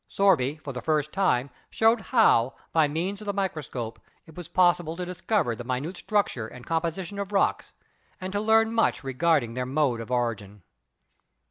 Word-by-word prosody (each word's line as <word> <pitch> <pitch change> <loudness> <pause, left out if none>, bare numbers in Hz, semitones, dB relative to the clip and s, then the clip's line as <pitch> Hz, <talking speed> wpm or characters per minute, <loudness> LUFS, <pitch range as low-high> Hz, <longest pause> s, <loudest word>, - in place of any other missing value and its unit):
Sorby, 195 -10 +3
82 - - 0
GEOLOGY 155 - -20
for 140 - -5
the 125 - -5
first 150 +1 0
time, 140 -9 +1 0.2
showed 225 +1 +3
how, 135 - +3 0.2
by 160 -2 +4
means 180 +7 -3
of 210 - -9
the 200 - 0
micro 190 -5 -2
scope, 115 -5 -6 0.3
it 160 - -15
was 175 -3 -8
possible 175 -3 +2
to 180 - -3
discover 180 - -1
the 120 - -7
minute 130 +8 -3
structure 200 - -1
and 125 +2 -12
composition 170 +4 -2
of 200 0 -4
rocks, 195 - 0 0.5
and 190 0 -5
to 205 - 0
learn 220 +1 +3
much 225 -9 +1
regarding 135 -2 +1
their 125 +1 -3
mode 130 -4 +1
of 115 - -9
origin. 110 -6 -2
160 Hz, 190 wpm, -26 LUFS, 125-195 Hz, 0.5 s, by